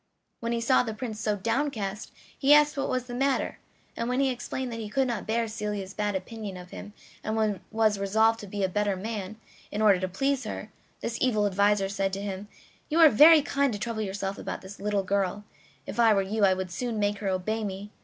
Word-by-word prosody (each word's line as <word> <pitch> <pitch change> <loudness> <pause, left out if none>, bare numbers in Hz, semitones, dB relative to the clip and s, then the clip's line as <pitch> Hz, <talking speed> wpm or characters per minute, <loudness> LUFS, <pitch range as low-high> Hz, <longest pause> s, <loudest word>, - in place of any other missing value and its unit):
When 230 0 -3
he 235 - 0
saw 255 +3 +4
the 225 -3 -4
Prince 220 -2 -5
so 210 -1 0
downcast 225 -2 -2 0.2
he 285 +1 +6
asked 295 0 +4
what 275 -1 -2
was 255 -1 0
the 245 -1 -9
matter, 270 +2 0 0.4
and 230 +1 -2
when 250 +1 0
he 270 -1 +3
explained 250 +1 -4
that 230 - -5
he 215 -2 -5
could 265 +3 +1
not 230 -4 -3
bear 230 +1 0
Celia's 210 -3 -4
bad 205 -1 -1
opinion 200 0 -5
of 180 0 -11
him, 205 - -9 0.3
and 215 -2 0
was 215 -2 +2
resolved 220 +3 +3
to 205 - -8
be 200 +1 -3
a - - +3
better 205 +1 0
man 210 +1 -5 0.3
in 210 - -3
order 205 -4 +5
to 185 - -1
please 270 +8 0
her, 215 0 -6 0.3
this 230 - -3
evil 215 -5 +2
adviser 200 0 +2
said 195 -1 -1
to 195 - -3
him: 200 0 -5 0.4
"You 320 +2 +1
are 320 -2 +9
very 300 +6 +8
kind 280 -1 +1
to 205 - -4
trouble 225 0 -3
yourself 195 -1 -3
about - - -5
this 190 +2 -11
little 205 -1 0
girl; 200 +1 -1 0.4
if - - -6
I 225 -2 +6
were 195 - +2
you 210 +2 -1
I 190 -1 +4
would 185 -1 -4
soon 235 +3 -3
make 205 -1 0
her 205 - -3
obey 215 +4 -1
me. 200 +1 -5
215 Hz, 225 wpm, -27 LUFS, 200-235 Hz, 0.4 s, are